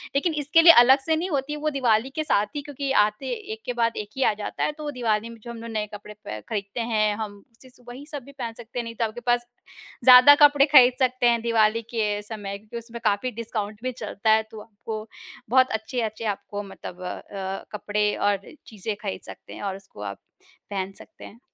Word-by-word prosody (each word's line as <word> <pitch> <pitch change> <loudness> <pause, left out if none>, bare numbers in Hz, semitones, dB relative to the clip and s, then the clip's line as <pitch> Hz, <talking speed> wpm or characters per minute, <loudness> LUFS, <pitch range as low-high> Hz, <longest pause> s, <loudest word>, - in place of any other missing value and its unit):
लेकिन 315 +4 +1
इसके 330 +4 +5
लिए 335 0 +10
अलग 265 +3 +6
से 320 - +2
नहीं 345 +4 -2
होती 290 -1 -2
वो 305 +1 -1
दिवाली 255 -3 +1
के 310 - -1
साथ 210 -8 +2
ही 290 - -2
क्योंकि 280 -1 -4
आते 210 +6 -3 0.3
एक 220 - -10
के 245 - -2
बाद 230 -1 0
एक 210 -1 -5
ही 265 - +2
आ - - +3
जाता 210 0 -4
है। - - +1
तो 305 0 -10
वो 295 - -3
दिवाली 230 -4 -1
में 230 - -11
जो 235 - -7
हम 235 - -8
लोग 230 0 -7
नए 210 -1 -2
कपड़े 210 0 -9
पे 105 - -5
खरीदते 200 0 -4
हैं 215 -1 +2
हम 205 -2 -6
उससे 245 +3 -18
स 245 0 -22
वही 255 +4 -9
सब 285 -4 -6
भी 280 - -13
पहन 245 -5 -6
सकते 240 +1 -7
हैं 240 - -2
नहीं 230 0 -8
तो 230 - 0
आपके 220 +2 -6
पास 240 0 +2 0.6
ज़्यादा 255 +3 +10
कपड़े 290 -1 +6
खरीद 260 -4 +7
सकते 255 -1 +2
हैं, 235 -1 +3
दिवाली 225 -1 +2
के 210 -3 -1
समय 205 -2 -6
क्योंकि 215 +3 -10
उसमें 235 0 -8
काफ़ी 210 +4 +1
डिस्काउंट 215 -2 -5
भी 255 - -1
चलता 220 -3 -3
है 220 0 +4
तो 215 -1 -9
आपको 215 0 -7 0.4
बहुत 260 +1 +5
अच्छे-अच्छे 220 0 -3
आपको 205 0 -4
मतलब 190 -2 -10
अ - - -4
अ, 195 -1 -6
कपड़े 210 0 -1
और 205 -1 +2 0.3
चीज़ें 215 0 -5
खरीद 195 -3 -4
सकते - - -11
हैं - - -9
और 195 -1 -2
उसको 195 - -13
आप 100 -1 -6 0.5
पहन 190 -1 -3
सकते - - -14
हैं। 225 - -13
230 Hz, 230 wpm, -25 LUFS, 210-255 Hz, 0.6 s, लिए